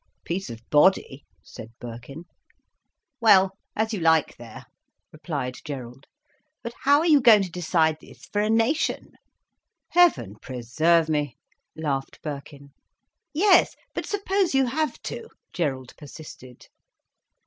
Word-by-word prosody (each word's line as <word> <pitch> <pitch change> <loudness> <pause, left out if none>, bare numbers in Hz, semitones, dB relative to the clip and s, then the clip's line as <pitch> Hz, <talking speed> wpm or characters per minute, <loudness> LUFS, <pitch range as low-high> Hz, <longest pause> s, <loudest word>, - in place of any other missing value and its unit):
"Peace 185 +3 -3
of 115 0 -10
body," 150 -3 +3 0.2
said 110 - -11
Birkin. 120 +7 -9 0.9
"Well, 195 -5 +5 0.2
as 220 +1 -1
you 205 - -2
like 160 -2 +2
there," 115 -2 -12 0.5
replied 145 -5 -5
Gerald. 135 -2 -8 0.6
"But 235 - -6
how 285 +2 +5
are - - -1
you 300 -4 +5
going 220 -5 +7
to 185 - -6
decide 160 -2 +1
this - - -16
for 205 - -2
a 210 - 0
nation?" 230 +8 0 0.8
"Heaven 310 - +3
preserve 155 +7 +1
me," 150 -4 -2 0.4
laughed 140 -4 -3
Birkin. 140 -1 -8 0.6
"Yes, 370 +5 +4 0.2
but - - -5
suppose 390 -5 0
you 270 0 +4
have 295 +2 -2
to?" 460 - -6 0.3
Gerald 135 -7 -3
persisted. 140 -4 -12
160 Hz, 125 wpm, -24 LUFS, 135-230 Hz, 0.9 s, going